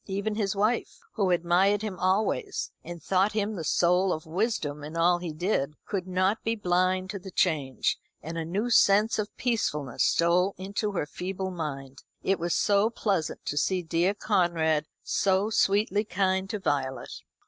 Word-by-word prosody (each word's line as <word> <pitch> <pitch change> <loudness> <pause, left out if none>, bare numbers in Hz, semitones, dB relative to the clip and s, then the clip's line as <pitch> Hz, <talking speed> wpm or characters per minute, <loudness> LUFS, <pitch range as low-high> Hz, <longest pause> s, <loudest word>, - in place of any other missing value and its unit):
Even 200 +2 -2
his 210 -1 -1
wife, 215 +4 0 0.2
who 200 -5 +1
admired 180 +4 +2
him 200 -4 -4
always, 215 - 0
and 170 -3 -8
thought 195 +2 +2
him 215 0 -1
the 170 - -4
soul 180 +4 +2
of 155 - -3
wisdom 160 -5 -2
in 155 +3 -6
all 175 +1 +3
he 175 -2 -4
did, 155 -3 -1
could 190 -3 -3
not 185 +3 +1
be 225 0 0
blind 185 -1 +1
to 200 - -5
the 190 - -9
change, 155 -8 0 0.2
and 165 +2 -7
a 165 - -2
new 200 +9 -2
sense 210 +1 +4
of 210 0 -1
peacefulness 150 - -1
stole 180 +3 +2
into 200 +2 -3
her 175 - -1
feeble 190 +4 -4
mind. 140 -6 -6 0.2
It 195 0 +1
was 170 0 0
so 205 +1 +3
pleasant 195 -9 -2
to 145 - -3
see 180 +5 +1
dear 170 +4 +1
Conrad 165 -7 +1 0.2
so 195 +2 +1
sweetly 205 0 +2
kind 190 -1 0
to 210 - -2
Violet. 135 -8 -2
185 Hz, 170 wpm, -27 LUFS, 165-205 Hz, 0.2 s, sense